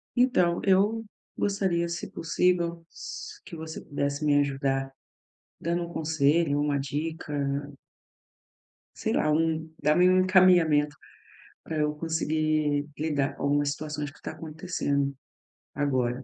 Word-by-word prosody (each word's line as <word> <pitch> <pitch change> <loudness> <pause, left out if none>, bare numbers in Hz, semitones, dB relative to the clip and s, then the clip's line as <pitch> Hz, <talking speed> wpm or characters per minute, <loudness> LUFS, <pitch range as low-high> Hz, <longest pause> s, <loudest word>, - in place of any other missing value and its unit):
Então, 210 -9 +3
eu 205 +4 +3 0.3
gostaria, 190 -4 0
se 170 0 -5
possível, 170 0 0
s 430 -1 -8
que 175 - -9
você 160 0 -6
pudesse 145 0 -2
me 145 -1 +4
ajudar 135 -1 0 0.7
dando 170 +1 -1
um - - -7
conselho, 155 -1 +2
uma 145 -1 +1
dica 150 +3 -4 1.6
sei - - -2
lá, 155 - +2
um 160 0 0
dar-me 155 +5 +4
um 185 0 +5
encaminhamento 175 -6 +4 0.7
pra 160 - -4
eu 150 0 +1
conseguir 155 -2 0
lidar 145 -3 -1
com - - -7
algumas 145 0 +2
situações 150 0 -4
que 150 - -21
tá - - -5
acontecendo 155 -4 -2 0.6
agora. 130 -3 0
155 Hz, 120 wpm, -27 LUFS, 145-170 Hz, 1.6 s, um